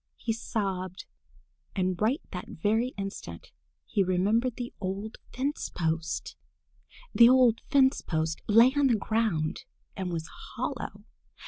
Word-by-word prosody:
he 225 Hz, -, -1 dB
sobbed. 190 Hz, -5 st, -3 dB, 0.7 s
And 185 Hz, -1 st, 0 dB
right 240 Hz, +8 st, +2 dB
that 180 Hz, -2 st, -5 dB
very 220 Hz, +8 st, 0 dB
instant 195 Hz, 0 st, -6 dB, 0.3 s
he 200 Hz, -3 st, +1 dB
remembered 210 Hz, +7 st, +1 dB
the 245 Hz, -1 st, -6 dB
old 200 Hz, +3 st, -4 dB
fence 275 Hz, +4 st, -2 dB
post! 160 Hz, -1 st, -2 dB, 0.8 s
The 235 Hz, 0 st, +8 dB
old 250 Hz, -3 st, +5 dB
fence 270 Hz, -1 st, +4 dB
post 160 Hz, -1 st, -2 dB
lay 230 Hz, +5 st, +6 dB
on 285 Hz, -1 st, +4 dB
the 240 Hz, -, +4 dB
ground 210 Hz, -8 st, 0 dB, 0.3 s
and 185 Hz, -2 st, -3 dB
was 165 Hz, -1 st, -3 dB, 0.3 s
hollow. -, -, -4 dB
210 Hz, 125 wpm, -28 LUFS, 185-235 Hz, 0.8 s, The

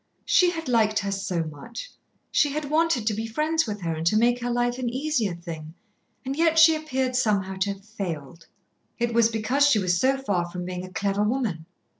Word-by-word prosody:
She 360 Hz, -2 st, +4 dB
had 330 Hz, -2 st, -5 dB
liked 220 Hz, -3 st, +2 dB
her 200 Hz, -1 st, -1 dB
so 195 Hz, -4 st, -2 dB
much, 160 Hz, -, -8 dB, 0.4 s
she 295 Hz, -, +3 dB
had 295 Hz, 0 st, -4 dB
wanted 315 Hz, -7 st, +2 dB
to 215 Hz, -, +1 dB
be 220 Hz, +2 st, -3 dB
friends 310 Hz, +6 st, 0 dB
with 210 Hz, -2 st, -4 dB
her 165 Hz, -2 st, -1 dB
and 160 Hz, +1 st, -2 dB
to 215 Hz, -, +3 dB
make 240 Hz, +2 st, +3 dB
her 245 Hz, -, -2 dB
life 245 Hz, +1 st, 0 dB
an 250 Hz, -2 st, -1 dB
easier 255 Hz, -, -1 dB
thing, 165 Hz, -2 st, -8 dB, 0.5 s
and 270 Hz, +1 st, -2 dB
yet 325 Hz, +1 st, +2 dB
she 320 Hz, 0 st, +8 dB
appeared 265 Hz, -5 st, -2 dB
somehow 200 Hz, -6 st, +1 dB
to 200 Hz, +1 st, 0 dB
have 195 Hz, 0 st, -17 dB
failed. 170 Hz, -7 st, -6 dB, 0.5 s
It 235 Hz, -1 st, -1 dB
was 230 Hz, -1 st, +4 dB
because 230 Hz, +6 st, +2 dB
she 285 Hz, -, +4 dB
was 180 Hz, -3 st, +1 dB
so 270 Hz, +1 st, +3 dB
far 190 Hz, -10 st, -1 dB
from 180 Hz, 0 st, -6 dB
being 180 Hz, 0 st, -5 dB
a 185 Hz, -, -9 dB
clever 200 Hz, +1 st, -1 dB
woman. 210 Hz, -8 st, -1 dB
220 Hz, 210 wpm, -25 LUFS, 185-265 Hz, 0.5 s, she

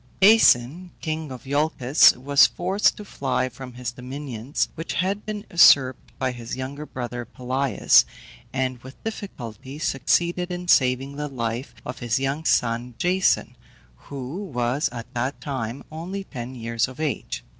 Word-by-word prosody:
Aeson, 180 Hz, -, +5 dB
king 155 Hz, -2 st, -4 dB
of 125 Hz, -3 st, -8 dB
Iolcus, 145 Hz, -1 st, +4 dB
was 140 Hz, +2 st, +5 dB
forced 190 Hz, +4 st, +1 dB
to 210 Hz, -, -8 dB
fly 130 Hz, -7 st, -1 dB
from 125 Hz, 0 st, -10 dB
his 125 Hz, -1 st, -4 dB
dominions, 130 Hz, +1 st, -4 dB
which 165 Hz, +1 st, -5 dB
had 195 Hz, +4 st, -1 dB
been 210 Hz, 0 st, -4 dB
usurped 135 Hz, -6 st, +5 dB
by 130 Hz, -1 st, 0 dB
his 120 Hz, 0 st, -6 dB
younger 140 Hz, +3 st, -6 dB
brother, 120 Hz, -1 st, -5 dB
Pelias, 130 Hz, 0 st, +3 dB, 0.5 s
and 130 Hz, -1 st, -1 dB
with 130 Hz, +3 st, -14 dB
difficulty 135 Hz, -, -7 dB
succeeded 170 Hz, +5 st, +1 dB
in 180 Hz, 0 st, -5 dB
saving 135 Hz, -1 st, +3 dB
the 150 Hz, 0 st, -3 dB
life 120 Hz, -1 st, -4 dB
of 125 Hz, -, -6 dB
his 120 Hz, -1 st, 0 dB
young 140 Hz, +4 st, -2 dB
son, 120 Hz, -1 st, +1 dB
Jason, 185 Hz, +1 st, +1 dB, 0.4 s
who 140 Hz, -, -7 dB
was 130 Hz, -4 st, -1 dB
at 115 Hz, -2 st, -6 dB
that 130 Hz, +3 st, -2 dB
time 130 Hz, -3 st, -4 dB
only 180 Hz, +5 st, -5 dB
ten 130 Hz, -6 st, -7 dB
years 115 Hz, -1 st, -1 dB
of 130 Hz, +2 st, -12 dB
age. 150 Hz, -7 st, -3 dB
135 Hz, 145 wpm, -24 LUFS, 125-160 Hz, 0.5 s, Aeson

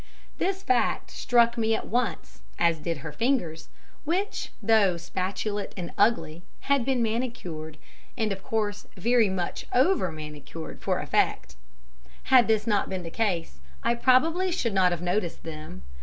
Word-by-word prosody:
This 385 Hz, +1 st, -1 dB
fact 255 Hz, -9 st, +1 dB
struck 235 Hz, -1 st, +3 dB
me 225 Hz, 0 st, +2 dB
at -, -, -4 dB
once, 245 Hz, 0 st, -2 dB, 0.2 s
as 170 Hz, -2 st, +2 dB
did 160 Hz, -2 st, -4 dB
her 155 Hz, -, -4 dB
fingers, 170 Hz, -, -1 dB, 0.3 s
which, 370 Hz, +7 st, -2 dB
though 215 Hz, -5 st, +4 dB
spatulate 190 Hz, +4 st, -3 dB
and 175 Hz, -2 st, -5 dB
ugly, 170 Hz, -7 st, +2 dB, 0.2 s
had 280 Hz, -2 st, +2 dB
been 255 Hz, -1 st, +1 dB
manicured, 215 Hz, -10 st, -3 dB, 0.4 s
and 220 Hz, -3 st, 0 dB
of 195 Hz, -1 st, -4 dB
course 210 Hz, -1 st, -2 dB
very 230 Hz, +2 st, +3 dB
much 185 Hz, -2 st, -3 dB
over 260 Hz, -, +3 dB
manicured, 155 Hz, +1 st, -8 dB
for -, -, 0 dB
effect. -, -, 0 dB, 0.8 s
Had 250 Hz, -3 st, +8 dB
this 220 Hz, -1 st, +2 dB
not 210 Hz, -3 st, +1 dB
been 185 Hz, -2 st, -3 dB
the 165 Hz, -, -6 dB
case, 175 Hz, -, -1 dB, 0.2 s
I -, -, +3 dB
probably 315 Hz, +10 st, +3 dB
should 235 Hz, -, -1 dB
not 185 Hz, -2 st, +4 dB
have 175 Hz, 0 st, -3 dB
noticed 180 Hz, -1 st, -1 dB
them. 155 Hz, -, -8 dB
210 Hz, 150 wpm, -27 LUFS, 170-240 Hz, 0.8 s, Had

